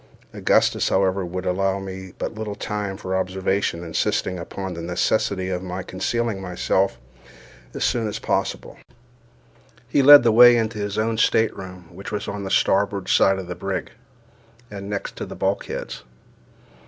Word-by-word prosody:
Augustus, - - +2
however, 95 0 +1
would 90 +1 -5
allow 95 +1 0
me 95 -1 -7
but - - -4
little 110 -2 -5
time 100 -2 -4
for 95 0 -3
observation, 95 -1 -1
insisting 85 +2 -1
upon 95 +2 -6
the 85 - -6
necessity 95 +2 0
of 90 -1 -2
my 90 0 -5
concealing 100 +3 -2
myself 95 -2 0 0.8
as - - -2
soon 115 -2 +1
as 105 - -4
possible. - - -2 1.1
He - - +2
led 145 0 +10
the 115 - +4
way 120 +2 +8
into 110 -1 -1
his 100 -1 -3
own 110 +1 0
stateroom, 95 -6 0
which 95 +3 -8
was 105 -1 -3
on 100 0 -4
the 95 - -4
starboard 100 0 +1
side 95 0 +4
of 95 - -5
the - - -5
brig, - - -4 0.8
and 100 -1 -7
next 100 -1 -4
to - - -4
the - - -8
bulkheads. - - -3
95 Hz, 155 wpm, -23 LUFS, 95-105 Hz, 1.1 s, led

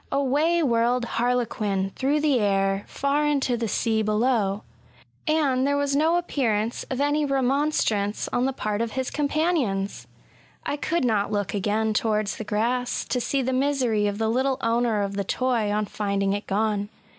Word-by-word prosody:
Away 295 +5 +2
whirled 240 -1 +2
harlequin 225 -5 -1
through 285 +3 +1
the 290 -5 +3
air 195 -1 +1
far 280 +2 0
into 275 -4 +1
the 230 -1 -2
sea 220 +2 0
below: 215 -2 +1 0.6
and 280 -4 +2
there 285 0 +1
was 285 -1 0
no 320 +4 +3
appearance 235 -10 -1
of 260 - -3
any 290 +1 +2
remonstrance 270 -6 0
on 245 - +2
the 270 - +1
part 215 -4 -2
of 230 -1 -2
his 260 -1 -2
companions! 285 - -1 0.6
I - - -1
could 315 0 -1
not 210 -3 +1
look 205 -2 -1
again 215 +2 0
towards 215 -1 0
the - - -4
grass, 235 +4 -1
to 250 - 0
see 275 +2 0
the 260 +1 -1
misery 255 -6 +1
of 205 0 -2
the 220 0 0
little 260 +3 +1
owner 230 -2 +1
of 200 0 -3
the 200 - 0
toy 235 0 0
on 210 0 0
finding 200 -1 -1
it 205 +1 -4
gone. 205 0 0
235 Hz, 170 wpm, -25 LUFS, 210-275 Hz, 0.6 s, the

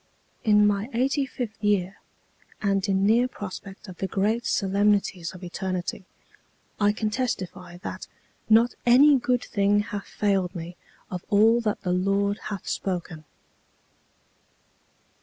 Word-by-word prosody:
"In 210 -2 +5
my 205 +2 +1
eighty 270 +3 +1
fifth 235 -4 -6
year, 195 -2 +1 0.6
and 195 -2 +1
in 195 0 +2
near 235 +4 +4
prospect 200 -3 -9
of 180 -2 -10
the 190 - -1
great 215 +5 0
solemnities 195 -3 +1
of 185 - -11
eternity, 185 +1 -4 0.7
I 205 -1 +4
can 215 0 -2
testify 185 -7 -4
that - - -6 0.4
not 230 +2 +5
any 270 +3 +6
good 250 0 0
thing 205 0 +2
hath 205 -2 -6
failed 195 -3 0
me 170 +1 -7 0.4
of 180 -1 -5
all 225 +3 +5
that 215 -2 -2
the 180 -2 0
Lord 200 +2 +1
hath 200 -3 -6
spoken." 175 -4 -4
200 Hz, 130 wpm, -25 LUFS, 190-220 Hz, 0.7 s, any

